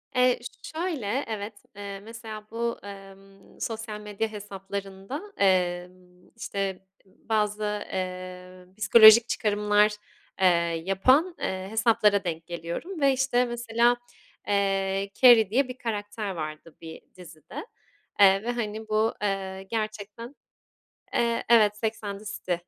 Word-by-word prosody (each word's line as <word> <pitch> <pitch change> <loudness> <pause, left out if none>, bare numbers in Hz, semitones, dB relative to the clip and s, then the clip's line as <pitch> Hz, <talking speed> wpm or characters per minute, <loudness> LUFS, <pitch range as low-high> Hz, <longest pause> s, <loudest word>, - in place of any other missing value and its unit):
Eee, 250 0 +4
ş 240 - -10
şöyle 280 - -1
evet, 215 -1 -5 0.2
eee, 200 -1 -7
mesela 220 0 -9
bu, 235 +1 -2
emm, 195 0 -13
sosyal 220 -1 -4
medya 210 +1 -3
hesaplarında, 200 - -6 0.2
emm, 180 -1 -1
işte 195 -4 -4 0.2
bazı, 210 +1 -2 0.3
eee, 185 0 -6
psikolojik 220 +1 +8
çıkarımlar, 210 0 +2 0.5
eee, 190 - +6 0.4
yapan, 260 - +3
eee, 190 0 -3
hesaplara 220 -2 +3
denk 165 -2 -4
geliyorum 175 - -6
ve 275 -1 +5
işte 255 -1 +2
mesela, 240 0 +1 0.5
eee, 195 -1 0
Carrie 235 -5 +8
diye 255 +5 +2
bir 255 0 -8
karakter 210 -2 -4
vardı 155 -1 -7
bir 160 -1 -9
dizide, 170 - -10 0.5
eee, 195 0 +6
ve 240 - -1
hani 220 -2 -4
bu, 215 +1 +1
eee, 195 -2 -2
gerçekten 215 +4 -5 0.8
Eee, 235 -1 +1
evet, 210 -3 +5
Sex 220 0 -3
and 200 -1 -5
the 215 - -14
City 185 -3 -3
210 Hz, 120 wpm, -26 LUFS, 195-230 Hz, 0.8 s, psikolojik